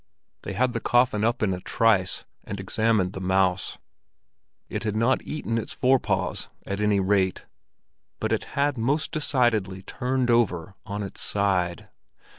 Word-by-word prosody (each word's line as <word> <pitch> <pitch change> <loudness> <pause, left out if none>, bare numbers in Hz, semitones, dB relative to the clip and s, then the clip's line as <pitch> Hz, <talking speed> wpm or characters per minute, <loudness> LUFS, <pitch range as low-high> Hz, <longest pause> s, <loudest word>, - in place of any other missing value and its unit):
They - - -5
had 125 0 +1
the - - -1
coffin 120 -3 +2
up 115 0 +1
in 95 -3 +2
a 90 - -4
trice, 100 -2 +1 0.2
and 100 - -6
examined 100 -1 +1
the 95 - -6
mouse. 95 0 +1 0.9
It - - -4
had 105 -1 -2
not 115 +4 +2
eaten 115 -7 -3
its 110 - -5
forepaws, 130 0 +1 0.2
at 100 +1 -3
any 105 -1 +3
rate, 95 -1 +1 0.7
but - - -2
it - - 0
had 140 -3 +1
most 140 +7 +1
decidedly 120 - +1
turned 125 +2 -1
over 95 -7 +1
on 105 0 -3
its 100 - -6
side. 95 -4 0
105 Hz, 150 wpm, -25 LUFS, 95-120 Hz, 0.9 s, any